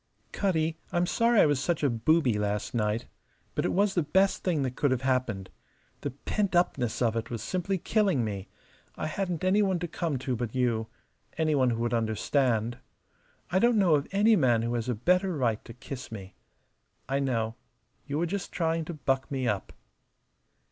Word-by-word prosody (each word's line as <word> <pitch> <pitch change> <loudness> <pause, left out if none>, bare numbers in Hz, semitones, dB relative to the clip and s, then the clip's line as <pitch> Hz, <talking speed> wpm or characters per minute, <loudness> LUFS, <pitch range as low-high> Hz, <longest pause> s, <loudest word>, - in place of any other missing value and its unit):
"Cutty, 165 -4 0
I'm 175 0 +2
sorry 230 +3 +3
I - - +6
was 145 -3 +2
such 160 +2 -1
a 145 - +4
booby 120 -1 +2
last 105 0 -2
night. 110 -1 0 0.5
But - - -1
it - - +1
was 200 +1 +2
the 175 - +2
best 190 +6 +2
thing 165 -6 +1
that 130 -1 -3
could 145 - +2
have 130 0 0
happened. 125 -8 -1 0.5
The 145 - -3
pentupness 145 - 0
of 115 -1 +1
it 115 - -3
was 115 -3 -4
simply 185 - -1
killing 190 - +1
me. 100 -3 -4 0.5
I - - -4
hadn't 175 +1 -2
any 190 +3 +4
one 190 -3 +2
to 175 0 -3
come 165 -3 -2
to 130 0 -2
but 120 0 -4
you 115 -3 +1 0.5
any 155 -1 +2
one 130 -3 +3
who 115 -1 -1
would 120 - -1
understand. 115 +1 0 0.7
I 185 - +3
don't 235 +2 +4
know 185 -6 +4
of 145 -1 +2
any 210 +3 +5
man 120 - +3
who 120 +1 -1
has 120 0 -2
a 125 - +1
better 180 - +2
right 115 -5 0
to - - -9
kiss 125 +1 -8
me. 95 -3 -8 0.7
I 135 +1 0
know. 115 -5 0 0.5
You 145 0 -2
were 170 - +1
just 195 +2 -4
trying 165 -1 0
to 170 - -6
buck 135 -2 -1
me 130 -3 -1
up." 105 -4 -2
140 Hz, 190 wpm, -28 LUFS, 115-175 Hz, 0.7 s, I